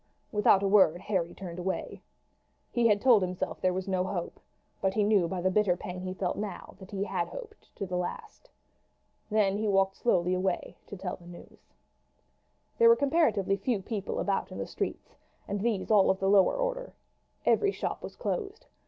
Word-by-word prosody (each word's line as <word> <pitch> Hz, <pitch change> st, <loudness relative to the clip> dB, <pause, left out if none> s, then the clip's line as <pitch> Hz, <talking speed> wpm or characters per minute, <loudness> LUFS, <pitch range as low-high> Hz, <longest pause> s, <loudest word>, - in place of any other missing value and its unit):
Without 210 Hz, -3 st, +4 dB
a -, -, +2 dB
word 190 Hz, -4 st, +5 dB
Harry 185 Hz, -4 st, -1 dB
turned 180 Hz, -2 st, -7 dB
away. 185 Hz, +1 st, -4 dB, 0.7 s
He 240 Hz, -1 st, +3 dB
had 210 Hz, -2 st, +3 dB
told 235 Hz, -3 st, +5 dB
himself 180 Hz, 0 st, -3 dB
there 185 Hz, -, +3 dB
was 185 Hz, +1 st, -3 dB
no 185 Hz, -1 st, +1 dB
hope; 185 Hz, -2 st, -4 dB, 0.4 s
but 190 Hz, 0 st, 0 dB
he 215 Hz, -, +3 dB
knew 205 Hz, -4 st, +3 dB
by 185 Hz, 0 st, -3 dB
the 185 Hz, +1 st, +1 dB
bitter 190 Hz, -3 st, +2 dB
pang 180 Hz, 0 st, -6 dB
he 185 Hz, 0 st, -5 dB
felt 185 Hz, -1 st, -2 dB
now 210 Hz, -1 st, -6 dB
that 190 Hz, -1 st, -12 dB
he 200 Hz, -1 st, -2 dB
had 185 Hz, -4 st, -2 dB
hoped 450 Hz, -4 st, -11 dB
to 200 Hz, -, -4 dB
the 180 Hz, -1 st, -4 dB
last. 180 Hz, -, -6 dB, 0.8 s
Then 205 Hz, -2 st, +2 dB
he 215 Hz, -, -1 dB
walked 195 Hz, -1 st, +2 dB
slowly 180 Hz, -6 st, +2 dB
away 185 Hz, 0 st, -1 dB
to 200 Hz, -, -8 dB
tell 180 Hz, -1 st, -4 dB
the 175 Hz, -, -16 dB
news. 175 Hz, 0 st, -14 dB, 1.0 s
There 465 Hz, 0 st, +7 dB
were 465 Hz, -, +8 dB
comparatively 250 Hz, -, +2 dB
few 235 Hz, -1 st, -1 dB
people 200 Hz, 0 st, -4 dB
about 200 Hz, -1 st, -1 dB
the -, -, -5 dB
streets, -, -, -5 dB, 0.3 s
and 200 Hz, 0 st, -2 dB
these 220 Hz, -2 st, -1 dB
all 205 Hz, -3 st, +5 dB
of 190 Hz, -, +3 dB
the 195 Hz, -, +1 dB
lower 200 Hz, -, +5 dB
order. -, -, -3 dB, 0.5 s
Every 405 Hz, -1 st, +3 dB
shop -, -, -4 dB
was -, -, -8 dB
closed. 440 Hz, -4 st, -4 dB
195 Hz, 190 wpm, -29 LUFS, 185-215 Hz, 1.0 s, were